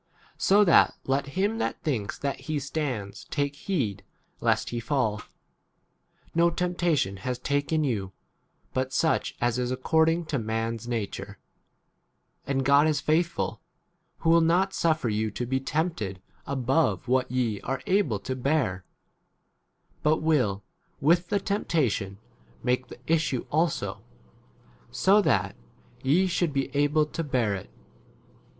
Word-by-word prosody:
So 205 +2 +5
that 170 - +5
let 135 +1 0
him 205 +4 +1
that - - -2
thinks 115 -10 -2
that 140 -1 -2
he 155 - -5
13 - - +1
stands 135 -8 -4
take 145 -1 -2
heed 140 - -2 0.4
lest - - +1
he 120 - -2
fall. 115 -4 0 1.1
No 170 +1 +4
temptation 170 - 0
has 125 +5 -3
taken 145 +4 0
you 105 -9 -1 0.6
but 130 0 -1
such 160 +4 +1
as 120 0 +1
is 125 -1 -1
according 160 +6 +2
to 140 - +2
man's 115 +1 -3
nature; 115 -4 -4 1.1
and 135 -1 0
God 140 +3 +5
is 150 -2 +1
faithful, 165 +3 0 0.6
who 165 - +3
will 170 0 +6
not 180 +4 +2
suffer 160 -6 +1
you 110 0 0
to 120 +4 -4
be 130 +2 0
tempt 160 +3 -1
ed 95 -2 -4 0.3
above 135 +1 +1
what 130 +1 +2
ye 120 -5 -1
are 135 +1 -3
able 185 - +2
[to 130 +6 -3
bear], 130 -9 0 1.2
but 155 +1 +3
will 125 -11 +1 0.4
with 170 +5 +3
the 205 - +2
tempta 170 - 0
tion 95 0 -4 0.5
make 125 0 0
the - - -11
issue 155 -4 +1
also, 160 +1 0 0.9
so 190 - +4
that - - +1 0.5
[ye] 150 +8 +4
f 185 - -2
should 170 -4 0
be 135 0 -2
able 145 +2 +3
to 165 +2 -4
bear 125 -8 0
[it. 100 0 -6
140 Hz, 145 wpm, -27 LUFS, 120-160 Hz, 1.2 s, will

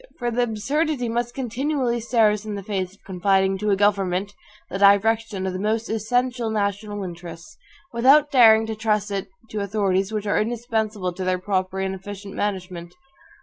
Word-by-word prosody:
For 240 -1 -2
the 240 +2 0
absurdity 250 +4 -1
must 240 +1 -2
continually 255 0 -1
stare 225 -2 +3
us 210 -1 -3
in 215 -1 -5
the 200 - -6
face 190 -2 -3
of - - -33
confiding 190 +1 +1
to 210 +1 -1
a 200 - +4
government 200 -1 +1 0.3
the 195 - -5
direction 200 0 +3
of 190 - -2
the 185 - -4
most 220 +3 -1
essential 240 +2 0
national 205 -1 -2
interests, 175 - -9 0.4
without 275 +5 +5
daring 225 -4 +7
to 220 0 -4
trust 210 -1 0
it 195 -1 -3 0.2
to 215 - -5
the - - -1
authorities 195 -1 0
which 215 -1 -3
are 205 - +2
indispensable 220 -4 -2
to 185 +2 -5
their 185 0 +1
proper 185 0 -2
and 190 0 -1
efficient 195 +1 -8
management. 180 -4 -4
210 Hz, 180 wpm, -23 LUFS, 190-230 Hz, 0.4 s, daring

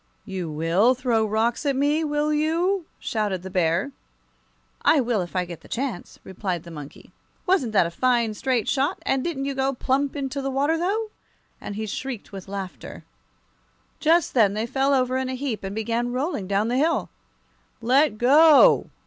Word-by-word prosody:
"You 185 -5 -5
will 170 +11 +2
throw 240 -3 +1
rocks 225 +5 0
at 280 -2 0
me, 290 +4 +1
will 300 0 0
you?" 335 +4 0
shouted 205 -5 -2
the 190 - -7
Bear. 180 - +1 0.9
"I 315 - +4
will 235 -5 0
if 175 0 -7
I 180 -1 +1
get 170 -2 -9
the - - -16
chance," 245 -7 -4
replied 185 -3 -4
the 170 - -11
monkey. 145 -3 -11 0.3
"Wasn't 360 - +2
that 190 - +4
a 170 - -4
fine, 235 +2 +1
straight 245 0 -1
shot? 275 +1 0
and 270 -1 0
didn't 285 -6 -3
you 280 - -2
go 270 0 0
plump 275 +3 0
into 275 -1 -3
the 270 - -2
water, 280 +4 +1
though?" 415 +6 -1 0.5
and 205 - -6
he 220 +1 -3
shrieked 245 +1 -6
with 195 -1 -9
laughter. 195 -2 -7 1.0
Just 330 +1 +2
then 210 -5 +3
they 215 +1 -1
fell 270 +3 +1
over 255 0 +1
in 260 0 -2
a 260 - -3
heap, 255 -6 -4
and 195 +1 -5
began 230 +2 -1
rolling 255 - -2
down 200 +2 +1
the 245 - 0
hill. 320 +4 +1 0.7
"Let 250 0 +2
go!" 290 +6 +6
250 Hz, 180 wpm, -24 LUFS, 205-280 Hz, 1.0 s, go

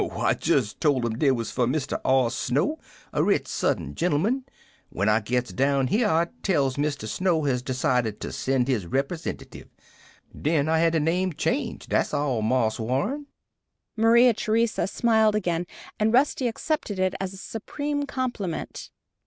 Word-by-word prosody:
"Oh, - - -3
I - - +3
jest 105 - 0
told 140 -6 +2
'em 115 0 -3
dey 145 - +4
was 120 -4 -1
for 125 -2 +1
Mr. 135 +2 -2
R. 130 -3 +3
Snow, 150 - 0 0.3
a - - +1
rich - - +2
Southern - - -1
gentleman. 190 - 0 0.4
When 100 +3 -1
I 110 +1 +4
gits 120 -1 -2
down 135 +2 +1
here, 220 - +2
I 165 0 +2
tells 140 -9 +1
Mr. 145 -6 -2
Snow 170 - 0
has 130 -4 0
decided 125 -4 0
to - - -4
send 130 -2 0
his 115 -10 0
repersentative! 140 - -4 0.7
Den 150 -1 +1
I 160 0 +2
had 165 0 +3
de 165 - +3
name 175 +4 0
changed - - -2
dat's - - +1
all, 135 -6 0
Marse 110 0 +1
Warren." 145 - -1 0.7
Maria 235 +2 +5
Theresa 225 0 0
smiled 220 0 +3
again, 175 -4 -1 0.3
and 215 +1 +2
Rusty 260 +1 +2
accepted 235 -3 -2
it 185 0 +1
as 195 0 -4
a - - -11
supreme 285 +8 -4
compliment. 240 -10 -4
160 Hz, 160 wpm, -25 LUFS, 130-215 Hz, 0.7 s, Maria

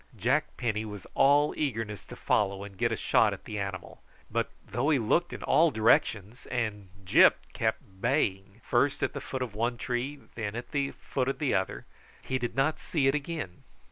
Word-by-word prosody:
Jack 135 +9 0
Penny 110 -3 -1
was 105 -3 -8
all 145 +2 +4
eagerness 115 -8 -2
to - - -10
follow 100 -1 0
and 100 -1 -10
get - - +1
a - - +1
shot - - +3
at - - -10
the 105 - -4
animal; 95 -2 -5 0.3
but - - 0 0.2
though 125 +7 -1
he 150 - +4
looked 135 +9 +1
in - - -7
all 165 +1 +5
directions, 110 -2 +1
and 110 -6 -3 0.2
Gyp - - +7 0.2
kept 95 0 -3
baying 105 -5 0
first 135 +3 +2
at - - 0
the - - -5
foot 130 -1 -3
of 120 -4 -6
one 120 +3 -1
tree 125 +4 -3
then 110 -2 -4
at 120 - -6
the 140 -1 0
foot 130 -2 -3
of 135 - -2
another, 130 -11 0 0.4
he 130 - -1
did 120 -1 -3
not 135 +4 +1
see 150 -5 -1
it 135 - +4
again. 150 - -4
120 Hz, 190 wpm, -29 LUFS, 105-140 Hz, 0.4 s, Gyp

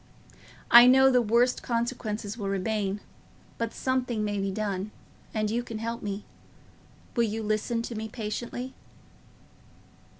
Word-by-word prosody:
I 240 +1 +11
know 265 +1 +7
the 250 -1 +4
worst 235 +3 +2
consequences 230 -3 -2
will 205 -4 -4
remain; 200 0 -1 0.6
but 230 -1 -1
something 250 -4 -1
may 205 -1 -1
be 195 0 -1
done, 200 0 -2 0.4
and 215 -1 -1
you 235 +2 0
can 230 -2 -6
help 230 +1 -4
me. 205 0 -4 0.9
Will 235 - +3
you 220 +1 -3
listen 215 +2 -1
to 235 - -5
me 220 0 -5
patiently?" 240 +3 -5
225 Hz, 135 wpm, -28 LUFS, 210-240 Hz, 0.9 s, I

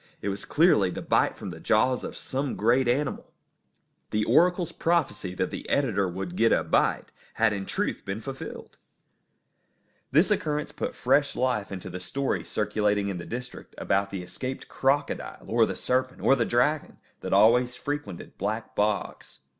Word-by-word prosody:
It 100 - -3
was 100 0 -4
clearly 145 - +4
the - - -5
bite - - +2
from 95 - -6
the 80 - -9
jaws 125 +7 +2
of - - -6
some 135 0 -2
great 120 +4 +3
animal. 135 +4 -1 0.8
The 105 0 0
oracle's 180 -1 +3
prophecy 165 - 0
that - - -1
the - - -6
editor 100 -9 +1
would 90 0 -5
get 115 +4 +3
a - - +3
bite - - +1 0.2
had 115 -2 +3
in 95 -1 -4
truth - - -2
been 95 +2 -4
fulfilled! 135 +3 -8 1.3
This 155 +10 +4
occurrence 150 -7 0
put - - -4
fresh 145 -1 +2
life 125 -6 0
into 95 -2 -6
the 90 - -5
stories 135 +9 -2
circulating 105 -1 +1
in 95 -3 -4
the 85 - -7
district 125 +1 -7
about 100 +1 0
the 95 -2 -5
escaped 130 +8 -6
crocodile, 135 +2 -1
or - - +3
the - - -3
serpent, 130 0 -1
or 135 - +5
the 120 -4 +1
dragon, 135 +7 +1 0.2
that - - -6
always 120 +5 +5
frequented 145 -12 -6
black 110 +3 -3
bogs. 105 0 -2
115 Hz, 165 wpm, -27 LUFS, 100-135 Hz, 1.3 s, or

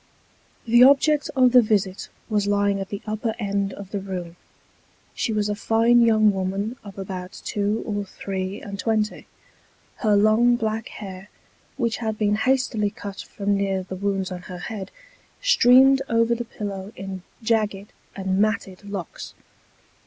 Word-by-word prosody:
The 240 +1 +5
object 285 +2 +4
of 255 -2 +5
the 250 0 +8
visit 200 -4 -1 0.2
was 210 -2 0
lying 200 -1 +2
at 195 -1 -5
the 200 - -6
upper 215 +1 -2
end 200 -2 -1
of 200 -1 -10
the 205 - -2
room. 180 -3 -6 0.8
She 230 - -2
was 210 -1 0
a 210 - 0
fine 225 +3 +3
young 215 -2 +5
woman 195 +4 -2
of 200 -2 -11
about 185 -1 -6
two 205 +1 -1
or 205 -2 -2
three 190 0 -5
and 200 -1 -8
twenty. 215 -1 -1 0.7
Her 215 -3 +2
long 215 +4 +4
black 220 -1 -2
hair, 195 -1 -9 0.5
which 235 -4 0
had 220 -2 -3
been 210 -1 +1
hastily 225 -2 +1
cut 200 0 -8
from 200 0 -2
near 195 -1 -1
the 185 0 -7
wounds 195 -1 -2
on 180 -1 -5
her 180 - -6
head, 195 +1 -6 0.5
streamed 270 - +6
over 230 0 +3
the 235 0 -3
pillow 200 -3 -6
in 190 -1 -6 0.2
jagged 210 -3 0 0.2
and 190 -1 -1
matted 205 -2 -1
locks. 195 -5 -7
205 Hz, 155 wpm, -23 LUFS, 195-225 Hz, 0.8 s, the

